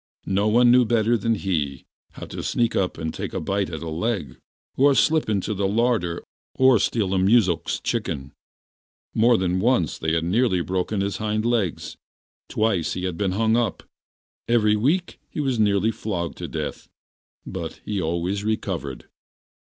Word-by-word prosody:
No 100 +2 +1
one 120 +3 +5
knew 125 0 +6
better 115 0 +2
than 115 +1 +1
he 75 -9 -2 0.3
how - - -8
to - - -7
sneak 120 -1 0
up 95 -2 0
and 80 -1 -4
take - - -5
a - - 0
bite 100 0 -1
at 80 -1 -6
a - - -5
leg, 85 - -3 0.4
or 140 +1 +4
slip 155 -2 +2
into 105 0 0
the 100 -1 0
larder 105 -6 0 0.3
or 130 -3 +5
steal 100 -2 0
a 95 - +2
muzhik's 95 -3 +2
chicken. 70 0 -3 0.8
More 115 +1 +4
than 90 0 0
once 115 - +1
they 80 0 -1
had 80 0 +1
nearly 95 +1 +2
broken 95 +3 -1
his 100 0 -2
hind 110 0 -1
legs, 115 -8 -1 0.5
twice 105 -7 0
he 90 - -4
had 90 -2 -2
been 95 +1 -1
hung 110 +2 +2
up, 120 -4 -1 0.6
every 110 -3 +3
week 155 - 0
he - - -6
was 135 -5 0
nearly 105 +1 +3
flogged 90 -7 -4
to - - -4
death, - - -5 0.6
but 85 -3 -6
he 105 -3 -2
always 85 +5 -1
recovered. 95 - -3
100 Hz, 170 wpm, -23 LUFS, 90-115 Hz, 0.8 s, knew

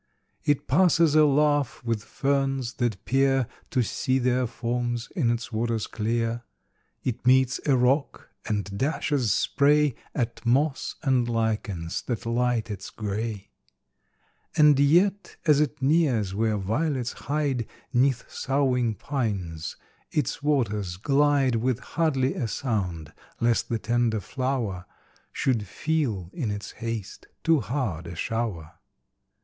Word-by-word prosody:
It 145 -2 +1
passes 165 0 +4
a 155 0 +6
laugh 145 -1 +2
with 115 -3 -1
ferns 135 -2 -1
that 110 -6 -1
peer 135 0 +3 0.2
To 125 - +1
see 130 +4 0
their 125 -1 +1
forms 120 0 -2
in 140 - +2
its 120 0 -2
waters 115 -1 -1
clear; 115 +1 -1 0.6
It 125 -3 -3
meets 130 0 +4
a 135 -3 +4
rock, 130 +4 +1 0.2
and 100 -2 -2
dashes 135 - 0
spray 145 +6 +3 0.2
At 120 -3 -2
moss 135 +4 +1
and 130 -4 +2
lichens 105 -7 -1
that 120 -1 -3
light 120 -1 0
its 100 -1 -6
gray; 105 -1 -4 1.1
And 150 -2 +6
yet, 180 +8 +3
as 150 -3 +5
it 150 -2 -2
nears 135 - +2
where 110 +1 +1
violets 125 - -1
hide 140 -5 -1 0.3
'Neath 130 0 +2
soughing 130 -4 0
pines, 100 - -3 0.3
its 150 - -1
waters 105 -11 0
glide 140 +1 +3
With 125 +1 0
hardly 140 -5 0
a 120 - -2
sound, 90 - -3 0.3
lest 115 0 +1
the 115 - 0
tender 115 +1 +1
flower 115 -5 -3 0.4
Should 115 -6 0
feel, 115 - -1
in 130 -10 -2
its 105 0 -5
haste, 115 -4 -6 0.2
too 165 -1 +4
hard 115 - -3
a 85 - -7
shower. 90 -6 -3
120 Hz, 125 wpm, -26 LUFS, 110-140 Hz, 1.1 s, a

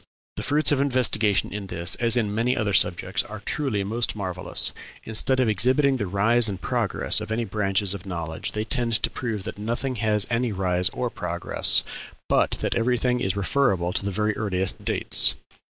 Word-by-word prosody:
The - - -5
fruits 150 +2 +1
of 140 -2 +2
investigation 115 -8 +2
in 105 -2 -5
this, 85 -1 -1
as 115 0 +1
in 105 -4 0
many 115 +4 0
other 105 -2 -1
subjects, 95 +1 +2
are 105 -1 -9
truly 130 -9 -1
most 115 +4 0
marvellous. 95 -3 -2 0.3
Instead 120 +4 +1
of 130 - +3
exhibiting 130 +6 +3
the 105 -5 -3
rise 110 +5 +3
and 95 -2 -5
progress 115 -3 0
of 110 0 -6
any 115 +1 -1
branches 100 -2 +1
of 100 -1 -8
knowledge, 85 -3 -4
they 105 - -2
tend 115 +1 0
to - - +2
prove 110 -6 -4
that - - -6
nothing 120 +4 -2
had 105 -1 +1
any 120 0 0
rise 90 -2 +1
or - - -3
progress, - - +1 0.5
but - - +3
that - - 0
everything 125 +1 +1
is 95 -5 -1
referable 95 -4 +1
to - - -1
the 100 - -1
very 105 +2 -1
earliest 95 -3 -1
dates. - - +2
105 Hz, 180 wpm, -24 LUFS, 95-120 Hz, 0.5 s, of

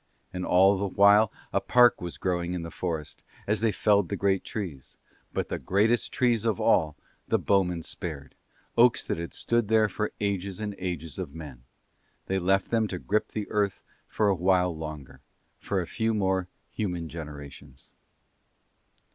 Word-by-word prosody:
And 90 0 -3
all 95 +2 +5
the 100 - 0
while 100 +2 +5 0.2
a - - +2
park 120 -3 +5
was 85 -1 -6
growing 90 -1 -1
in 85 - -4
the 85 - -7
forest, 80 -5 -4 0.2
as 105 +1 0
they 115 -1 +3
felled 100 -2 +2
the - - -1
great 95 -1 +1
trees; 85 - -6 0.3
but - - -3
the - - -3
greatest 105 - +1
trees 120 -4 +2
of 110 -4 0
all 75 -2 +3 0.3
the - - +2
bowmen 90 -4 +1
spared, 80 -6 -6 0.4
oaks 120 +1 +4
that - - -2
had 85 - -6
stood 120 -2 +1
there 110 0 +4
for 105 +1 -3
ages 100 -1 -2
and 105 -1 -3
ages 85 -5 -4
of 70 - -6
men; 70 -7 -10 0.6
they 95 0 0
left 95 +1 +1
them 115 -2 +2
to 95 - -4
grip 105 +4 0
the 105 -2 -5
earth 105 -2 0 0.2
for 105 - +1
a 100 - +4
while 90 -1 +2
longer, 75 -3 -8 0.4
for 100 - -1
a 90 - -2
few 110 +4 -1
more 95 -3 0 0.2
human 90 -6 -3
generations. 70 -4 -10
95 Hz, 170 wpm, -27 LUFS, 85-105 Hz, 0.6 s, all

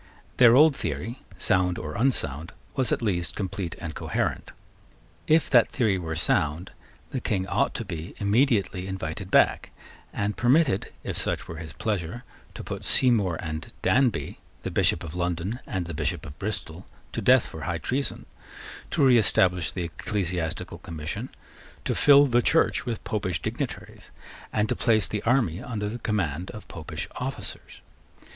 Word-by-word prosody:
Their 120 -1 +8
old 150 +1 +7
theory, 120 0 -4 0.2
sound 90 0 +2
or 75 0 -5
unsound, 85 - 0 0.2
was 130 -3 +1
at - - 0
least 90 -6 0
complete 95 -3 -3
and 80 -2 -5
coherent. - - -2 0.8
If 160 +1 +4
that 120 -4 +6
theory 105 -6 +1
were 80 -2 -4
sound, 80 +2 0 0.4
the 130 - -3
King 95 -5 -1
ought - - 0
to - - -3
be 80 +3 -6
immediately 105 -4 +1
invited 95 0 -5
back, - - +3 0.4
and 105 +1 -2
permitted, 130 -3 +2
if - - -3
such - - 0
were 80 - -7
his 80 -1 -8
pleasure, 105 +2 -3 0.3
to - - -6
put - - -6
Seymour 105 -10 +3
and 80 -1 -5
Danby, 130 -3 +1 0.2
the - - -3
Bishop - - +2
of 80 -2 -7
London 90 +5 -2
and 95 -3 -2
the 85 - -6
Bishop 75 -2 -2
of 75 +2 -10
Bristol, 95 -4 -5 0.2
to - - -3
death - - +5
for 80 - -8
high 85 +1 -2
treason, 130 - -2 0.6
to 140 - +2
reestablish 95 -8 +4
the 90 +2 -3
Ecclesiastical 85 -1 -3
Commission, 80 -2 -5 0.6
to - - +1
fill 145 0 +7
the 120 -3 +3
Church 160 -1 +2
with 115 -3 -3
Popish 95 -6 -2
dignitaries, - - -5 0.4
and 105 0 +1
to - - 0
place 110 -3 +3
the 105 - -3
army 115 -8 +2
under 105 -4 -3
the 115 +4 -5
command 90 -7 -1
of 105 - -9
Popish 85 -4 -6
officers. - - -6
95 Hz, 155 wpm, -26 LUFS, 85-120 Hz, 0.8 s, Their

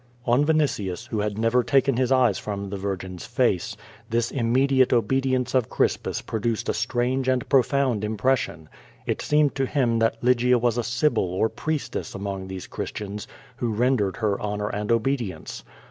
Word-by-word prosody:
On 125 +4 +3
Vinitius, 120 - 0
who 110 - -2
had 105 0 -2
never 115 +2 +2
taken 135 +1 +3
his 130 +1 +1
eyes 125 -6 +3
from 100 -2 -5
the - - -3
vir 100 0 -2
gin's 90 -1 -8
face, - - 0 0.3
this 115 +1 0
immediate 130 +1 +2
obedience 130 +1 +1
of 130 -4 +2
Crispus - - 0
produced 110 0 -2
a - - +2
strange 125 +3 0
and 130 -1 +1
])rofound 130 -4 +2
impression. 105 -7 -1 0.4
It - - -2
seemed 150 -1 +2
to 135 -1 -1
him 120 -6 +1
that 115 0 +2
Lygia 125 0 +4
was 120 0 +1
a - - 0
sibyl 120 -4 +1
or 100 +5 +1
priestess 155 +3 -4
among 95 -1 -4
these 95 -1 -6
Christians 105 0 -6 0.3
.who 120 -3 -1
rendered 110 -3 +1
her 105 -3 0
honor 105 0 -2
and 105 +2 -3
obedience. 115 - -1
120 Hz, 165 wpm, -24 LUFS, 105-130 Hz, 0.4 s, Lygia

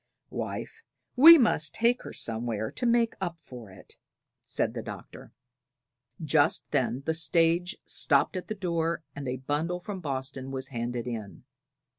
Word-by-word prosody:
"Wife, 450 - -5 0.3
we 325 +6 +10
must 155 - +1
take 235 +2 +2
her - - -8
somewhere 110 -1 -2
to 245 - -2
make 235 -1 +3
up 170 -3 -3
for 125 -8 -11
it," 95 -1 -14 0.5
said - - -2
the - - -4
Doctor. - - -10 0.9
Just 155 0 +2
then 135 -1 0
the 160 - +1
stage 165 +3 +1
stopped - - +2
at 185 - -5
the 215 - -4
door 170 -4 -1
and 140 -1 -6
a 125 +1 -2
bundle 150 +7 -2
from 195 +1 -6
Boston 135 -2 -4
was 135 0 -4
handed 120 -1 -4
in. 110 -5 -6
155 Hz, 150 wpm, -28 LUFS, 130-180 Hz, 0.9 s, we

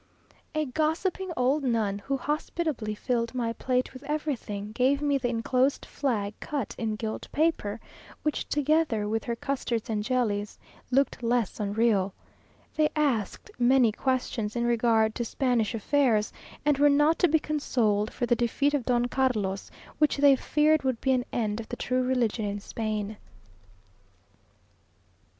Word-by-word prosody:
A 310 0 +1
gossiping 320 +7 -1
old 265 +4 +2
nun, 220 -5 0
who 275 +6 -2
hospitably 295 -5 -2
filled 235 +2 -1
my 230 -2 -1
plate 255 +2 -1
with 255 - -10
everything, 260 -9 -3
gave 260 +5 +2
me 285 -1 +1
the 245 - -1
enclosed 255 +4 +1
flag 220 -7 -2
cut 280 -7 -3
in 220 -2 -1
gilt 220 0 -5
paper, 290 -9 0 0.4
which, 300 - -2
together 295 -7 +1
with 220 +1 -1
her 235 - -2
custards 235 -3 -2
and 210 -1 -1
jellies, 210 -4 -1 0.3
looked 270 0 +1
less 235 -2 0
unreal. 205 -2 +1 0.6
They 305 -1 +4
asked 280 - -1
many 245 -1 +5
questions 245 -3 -2
in 235 - 0
regard 230 -2 +2
to 240 - -2
Spanish 240 -2 0
affairs, 225 -2 +2 0.3
and 295 -2 +3
were 290 0 +6
not 295 +3 +3
to 355 - +5
be 320 0 +4
consoled 235 -9 0
for 245 - -2
the 240 - +3
defeat 245 +5 +1
of 275 -5 0
Don 245 -1 +2
Carlos, 225 -7 -1 0.3
which 300 -1 +3
they 280 -1 +6
feared 305 +3 +2
would 260 -3 -1
be 265 - +1
an 250 -1 +1
end 215 -2 -1
of 225 - -8
the - - -3
true 255 +1 0
religion 245 -4 0
in 205 0 -3
Spain. 215 0 -4
245 Hz, 150 wpm, -27 LUFS, 220-280 Hz, 0.6 s, were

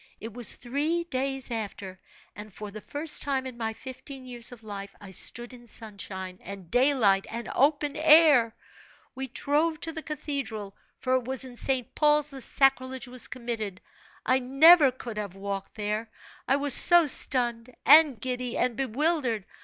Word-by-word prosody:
It 225 0 -8
was 240 -1 +5
three 295 +7 -2
days 270 -4 -3
after, 200 -4 -6 0.4
and 210 +1 -10
for 210 +2 -9
the 215 +1 -9
first 300 +6 +1
time 270 -2 -2
in 255 -2 -7
my 225 -2 -3
fifteen 260 +2 -9
years 240 -1 -1
of 235 -2 -13
life, 200 -2 -8
I 200 -2 -12
stood 240 +6 0
in 240 -1 -14
sunshine, 195 -4 -8
and 195 -3 -10
daylight, 245 -7 +2
and 235 +1 -6
open 290 +1 +1
air. 305 -7 +5 0.6
We 265 +1 -6
drove 295 +5 -1
to 325 - -3
the 320 0 -6
cathedral 260 -10 -5 0.2
for 255 - -2
it 250 - -6
was 265 +1 -1
in 250 -1 -11
St. 260 0 -2
Paul's 300 -1 +2
the 270 -1 -9
sacrilege 260 0 +1
was 250 0 -4
committed. 230 -6 -5 0.5
I 260 +1 +2
never 280 +4 +6
could 240 -3 -9
have 200 -3 -6
walked 195 0 -6
there, 215 +1 -3 0.4
I 270 - +3
was 285 -1 +2
so 345 +4 +7
stunned, 245 -4 0
and 295 -4 +6
giddy, 250 0 -4
and 250 -2 0
bewildered. 265 - -1
250 Hz, 165 wpm, -26 LUFS, 220-280 Hz, 0.6 s, so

